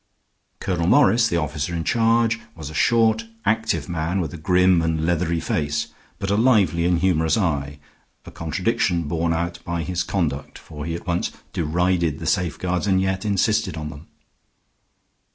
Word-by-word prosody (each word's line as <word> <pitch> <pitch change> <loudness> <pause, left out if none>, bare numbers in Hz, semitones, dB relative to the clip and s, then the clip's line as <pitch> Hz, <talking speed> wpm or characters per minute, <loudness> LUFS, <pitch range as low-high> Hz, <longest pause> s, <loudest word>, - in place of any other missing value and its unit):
Colonel 85 -3 -1
Morris, 120 -2 +5
the 85 - 0
officer 75 +1 -2
in 85 - -2
charge, 115 +1 +2 0.2
was 80 -2 -7
a - - -10
short, 115 +5 +3 0.2
active 110 +2 0
man 85 +2 -1
with 85 -3 -3
a - - -6
grim 90 +1 +3
and 80 -1 0
leathery 85 0 0
face, 75 -2 -1 0.3
but 95 - -3
a - - +3
lively 100 - +3
and 90 0 +3
humorous 80 -2 +2
eye 75 -7 -1 0.5
a - - -10
contradiction 85 -1 0
borne 80 +2 -1
out 85 +1 -2
by 85 -1 -3
his 90 +2 -2
conduct, 80 -8 -2
for 75 -2 -9
he 85 - -2
at 85 - -8
once 85 0 -1 0.2
derided 85 -1 0
the 85 - -7
safeguards 90 +1 -1
and 95 -1 +3
yet 95 +1 -1
insisted 105 -2 +1
on 75 -1 -4
them. 75 +3 -12
85 Hz, 165 wpm, -22 LUFS, 80-95 Hz, 0.5 s, Morris